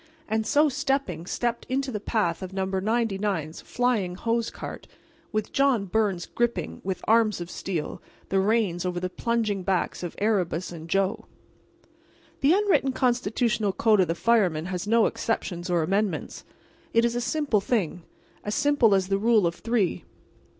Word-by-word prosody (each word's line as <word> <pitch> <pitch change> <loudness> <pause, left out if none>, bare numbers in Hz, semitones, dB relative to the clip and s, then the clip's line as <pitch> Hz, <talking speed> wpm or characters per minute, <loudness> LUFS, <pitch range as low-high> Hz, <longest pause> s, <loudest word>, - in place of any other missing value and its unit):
And 220 0 -1
so 300 +2 +4
stepping, 270 - -1
stepped 240 +1 -2
into 265 +1 -1
the 210 - -3
path 200 -6 -1
of 185 0 -6
No. 190 0 -1
99's 195 -4 -1
flying 235 -8 0
hose 230 +3 -1
cart, - - -8 0.4
with 215 -1 -2
John 270 -7 +2
Byrnes 195 -3 0
gripping, 240 0 -2
with 190 0 -4
arms 220 -3 +3
of 175 0 -6
steel, 170 -6 -4 0.3
the 195 - +2
reins 200 -4 +1
over 180 -1 -2
the 180 0 -3
plunging 225 -4 -1
backs 185 -1 -1
of 175 -2 -5
Erebus 185 -5 0
and 165 -1 -9
Joe. 195 +4 0 1.1
The 280 +2 +4
unwritten 385 -9 +2
constitutional 235 -4 +1
code 215 -1 +3
of 185 - +4
the 165 - -1
fireman 180 -7 +2
has 180 +1 -4
no 230 +1 +4
exceptions 180 -5 -2
or 175 -2 +2
amendments. 195 +1 -1 0.5
It 230 +1 +5
is 235 - +1
a 240 - 0
simple 250 -4 +1
thing—as 200 0 -4
simple 285 -8 +4
as 190 -1 +1
the 195 0 +1
rule 220 -2 +4
of 170 - +1
three. 220 -3 -1
210 Hz, 155 wpm, -26 LUFS, 185-235 Hz, 1.1 s, It